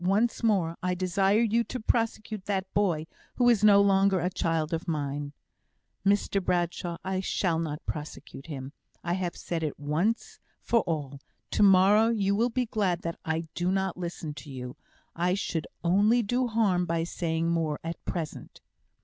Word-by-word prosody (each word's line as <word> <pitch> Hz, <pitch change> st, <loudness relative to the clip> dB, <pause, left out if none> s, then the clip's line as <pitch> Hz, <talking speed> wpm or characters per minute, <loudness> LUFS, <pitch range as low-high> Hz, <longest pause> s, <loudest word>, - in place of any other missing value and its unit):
Once 205 Hz, +6 st, +1 dB
more, 190 Hz, -8 st, +2 dB
I 180 Hz, 0 st, 0 dB
desire 190 Hz, +4 st, +2 dB
you 230 Hz, 0 st, +2 dB
to 255 Hz, -, -5 dB
prosecute 220 Hz, -2 st, -1 dB
that 195 Hz, -2 st, -1 dB
boy, 175 Hz, -7 st, +1 dB, 0.3 s
who 245 Hz, -, +3 dB
is 220 Hz, -4 st, +3 dB
no 205 Hz, -1 st, +7 dB
longer 195 Hz, -1 st, +4 dB
a 180 Hz, +2 st, -1 dB
child 165 Hz, -2 st, -1 dB
of 165 Hz, +2 st, -3 dB
mine." 145 Hz, -2 st, -2 dB, 0.7 s
"Mr 200 Hz, -1 st, +2 dB
Bradshaw, 175 Hz, -1 st, -1 dB
I 190 Hz, 0 st, -1 dB
shall 185 Hz, -3 st, 0 dB
not 155 Hz, -2 st, -4 dB
prosecute 150 Hz, -1 st, -7 dB
him. 135 Hz, -2 st, -6 dB, 0.3 s
I 175 Hz, -, -1 dB
have 180 Hz, -1 st, -2 dB
said 170 Hz, -2 st, -3 dB
it 155 Hz, -3 st, -3 dB
once 160 Hz, +11 st, -1 dB, 0.2 s
for 235 Hz, -, +2 dB
all. 145 Hz, -4 st, -3 dB, 0.3 s
To -, -, +1 dB
morrow 200 Hz, +2 st, +6 dB
you 200 Hz, -3 st, +1 dB
will 235 Hz, +4 st, +2 dB
be 250 Hz, +1 st, 0 dB
glad 195 Hz, -6 st, -1 dB
that 170 Hz, 0 st, -4 dB
I 160 Hz, 0 st, -1 dB
do 175 Hz, +1 st, -1 dB
not 190 Hz, -1 st, 0 dB
listen 170 Hz, -3 st, -5 dB
to 150 Hz, -, -13 dB
you. 125 Hz, -2 st, -7 dB, 0.4 s
I 180 Hz, +2 st, +1 dB
should 165 Hz, -5 st, -2 dB, 0.2 s
only 205 Hz, +7 st, +4 dB
do 245 Hz, +4 st, 0 dB
harm 200 Hz, -6 st, +1 dB
by 165 Hz, 0 st, 0 dB
saying 165 Hz, -1 st, -1 dB
more 160 Hz, -3 st, 0 dB
at 165 Hz, +1 st, -6 dB
present." 165 Hz, -4 st, -5 dB
180 Hz, 170 wpm, -28 LUFS, 165-205 Hz, 0.7 s, no